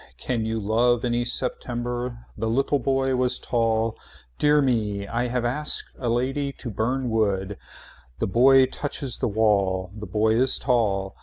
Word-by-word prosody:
Can 115 -3 -2
you 110 0 -1
love 115 +3 +2
any 120 0 0
September. 120 -1 -2
The 110 +1 -2
little 135 +4 +1
boy 135 -1 +1
was 125 0 +1
tall. 115 -1 0 0.4
Dear 150 0 +4
me. 110 -7 0
I 120 +3 -1
have 120 0 -1
asked 150 +5 -1
a 125 - -2
lady 135 +4 -1
to 120 - -7
burn 125 +6 -1
wood. 100 -3 0 0.6
The - - -1
boy 130 +6 +5
touches 140 -1 -4
the - - 0
wall. 100 -4 +1
The 105 -1 -7
boy 110 +3 +1
is 130 +3 +3
tall. 100 -6 0
120 Hz, 155 wpm, -24 LUFS, 110-130 Hz, 0.6 s, boy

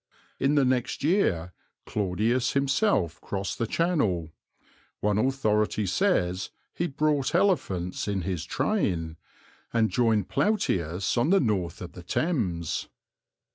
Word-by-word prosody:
In 140 +2 +2
the 140 -2 +4
next 125 0 0
year 90 - +1 0.3
Claudius 110 +6 0
himself 135 - +1
crossed 100 0 -4
the 115 - 0
Channel 110 - 0 0.7
one 105 0 +1
authority 110 -5 +1
says 95 - +1 0.2
he 175 - -1
brought 150 -1 0
elephants 130 - +1
in 100 -2 -1
his 90 -3 -3
train 85 - -1 0.5
and 115 -2 +2
joined 110 -5 +2
Plautius 95 - 0
on 120 - +2
the 195 +1 +5
north 95 - -1
of 90 - -8
the 90 - -10
Thames. 90 - -1
110 Hz, 120 wpm, -27 LUFS, 90-145 Hz, 0.7 s, the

